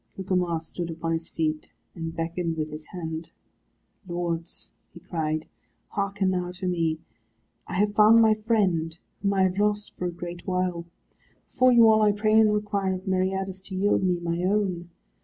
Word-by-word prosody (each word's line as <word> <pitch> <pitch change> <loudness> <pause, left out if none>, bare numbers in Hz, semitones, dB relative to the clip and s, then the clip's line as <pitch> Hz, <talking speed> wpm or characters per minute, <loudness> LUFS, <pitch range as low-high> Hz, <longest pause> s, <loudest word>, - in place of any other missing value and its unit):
Gugemar 180 -3 0
stood 170 +1 -6
upon 165 0 -3
his 165 0 -2
feet, 155 -1 -2 0.2
and 165 -1 -5
beckoned 165 0 -2
with 155 -1 -2
his 155 0 -7
hand. 160 -2 -6 0.8
"Lords," 170 -1 -3 0.2
he - - -9
cried, 155 -2 -3 0.4
"hearken 200 -1 0
now 180 -1 -2
to 185 +1 -4
me. 165 -3 0 0.7
I - - -5
have 205 +2 +2
found 215 +2 +7
my 220 -1 +6
friend, 195 -7 0 0.2
whom 200 0 +1
I 190 - +4
have 185 +1 +1
lost 210 0 0
for 180 - -2
a - - -2
great 175 0 -8
while. 180 -2 -1 0.6
Before 255 0 +4
you 235 -2 +7
all 220 0 +5
I 210 -1 +4
pray 215 +1 +1
and 215 -1 +5
require 200 -2 0
of 185 +1 -8
Meriadus 190 0 -1
to 190 - -7
yield 200 +2 +2
me 180 -2 +2
my 170 0 -2
own. 185 -3 0
180 Hz, 175 wpm, -26 LUFS, 170-205 Hz, 0.8 s, found